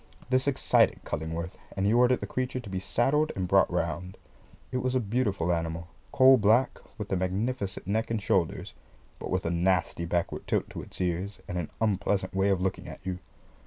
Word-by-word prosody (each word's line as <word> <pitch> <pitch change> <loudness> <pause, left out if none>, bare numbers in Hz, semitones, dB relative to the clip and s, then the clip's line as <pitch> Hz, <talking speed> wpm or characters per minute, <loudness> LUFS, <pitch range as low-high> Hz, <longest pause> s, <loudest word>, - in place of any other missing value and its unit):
This 130 +2 +2
excited 140 - +3
Cullingworth, 80 +3 -4 0.2
and 95 - +1
he 105 - +3
ordered 125 +1 +4
the - - -2
creature 130 0 -2
to 115 -5 -9
be 95 - -2
saddled 140 +10 +1
and 95 -2 -2
brought - - +4
round. 90 +2 -2 0.5
It 130 - -1
was 130 0 -1
a - - +4
beautiful 100 -6 0
animal, 85 0 -3 0.2
coal 130 0 +7
black, 110 +5 +3 0.2
with 105 -2 -6
a - - +2
magnificent 100 +3 -2
neck 110 +4 0
and 115 -1 0
shoulders, 95 -3 0 0.5
but - - -6
with 90 -1 -1
a 85 - 0
nasty 85 -1 +1
backward 85 0 -2
tilt - - 0
to - - -6
its - - -10
ears, 90 +3 -2
and 90 - -3
an 80 - -4
unpleasant 100 -3 0
way 95 +1 +2
of 95 -2 +2
looking 95 0 -2
at - - -10
you. 90 -1 -3
95 Hz, 195 wpm, -28 LUFS, 90-120 Hz, 0.5 s, coal